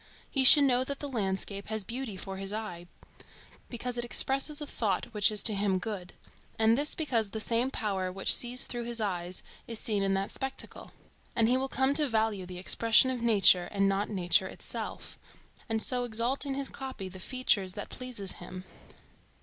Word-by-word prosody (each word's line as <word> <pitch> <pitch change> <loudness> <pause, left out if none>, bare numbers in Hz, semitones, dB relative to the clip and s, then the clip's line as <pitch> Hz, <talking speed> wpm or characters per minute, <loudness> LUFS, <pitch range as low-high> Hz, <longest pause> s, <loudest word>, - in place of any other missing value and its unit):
He 270 - +3
should 285 +2 +10
know 255 -2 +3
that 280 +1 -5
the 290 - -5
landscape 200 -4 -3
has 220 -1 -3
beauty 235 -1 -5
for 195 +1 -7
his 195 0 -4
eye 210 -5 -6 0.8
because 245 0 -4
it - - -1
expresses 270 +5 +1
a 295 - -4
thought 210 -9 -2
which 210 0 +5
is 210 - 0
to 220 - +8
him 200 -1 0
good; 185 -2 -6 0.4
and 225 +1 +3
this 290 +4 +1
because 235 -9 0
the 220 - -5
same 235 +3 +2
power 195 -7 -3
which 195 +1 +5
sees 245 +1 +4
through 240 -1 -5
his 235 0 -2
eyes 180 -4 -3 0.2
is 230 - -3
seen 210 -3 0
in 195 0 0
that 195 +1 -3
spectacle; 270 0 -5 0.4
and 225 -1 +2
he 245 - +3
will 265 +1 -1
come 265 +1 +1
to 295 0 +2
value 220 -5 -1
the 180 0 -8
expression 230 +7 +3
of 250 -2 -4
nature 200 -6 +4
and 195 -1 0
not 195 +1 -1
nature 180 -4 +2
itself, - - -6 0.5
and 220 -1 0
so 250 -1 0
exalt 245 +4 -1
in 270 - -3
his 275 0 0
copy 260 -8 -7
the 185 0 -11
features 200 -4 0
that - - -7
please 255 -1 -5
him. 185 0 -9
220 Hz, 190 wpm, -29 LUFS, 195-255 Hz, 0.8 s, should